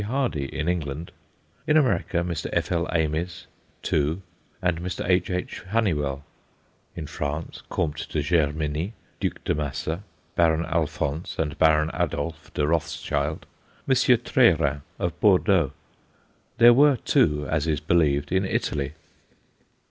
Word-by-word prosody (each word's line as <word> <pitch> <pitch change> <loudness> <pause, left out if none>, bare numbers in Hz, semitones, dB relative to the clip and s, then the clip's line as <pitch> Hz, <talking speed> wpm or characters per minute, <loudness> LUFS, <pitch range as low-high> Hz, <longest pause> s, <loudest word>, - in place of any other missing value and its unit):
Hardy, 115 - -1
in 75 +3 -4
England; 80 -2 -2 0.6
in 150 - +5
America, 120 - +2
Mr. 85 -3 -3
F.L. 85 0 0
Ames, 85 +2 -1 0.4
two, 80 +6 0 0.4
and 85 -2 0
Mr. 90 0 -4
H.H. 90 0 0
Hunnewell; 75 -11 0 0.7
in 80 - -5
France, 75 +1 -4
Comte 75 -1 -2
de 75 - -1
Germiny, 75 +3 0 0.3
Duc - - -3
de - - +1
Massa, 75 +4 -3 0.3
Baron 85 -1 +3
Alphonse 80 -1 -2
and 75 -2 -1
Baron 80 0 +4
Adolf 80 -2 -3
de 75 - +1
Rothschild, 75 -1 -1 0.4
M. 135 - +4
Treyeran 115 - +3 0.2
of 85 - -3
Bordeaux. 95 - +4 0.9
There 120 0 +8
were 140 +1 +5
two, 75 -8 +2
as 80 0 0
is 75 -3 +1
believed, 75 -3 +1
in 95 +1 +2
Italy. 75 -6 -1
80 Hz, 120 wpm, -25 LUFS, 75-90 Hz, 0.9 s, There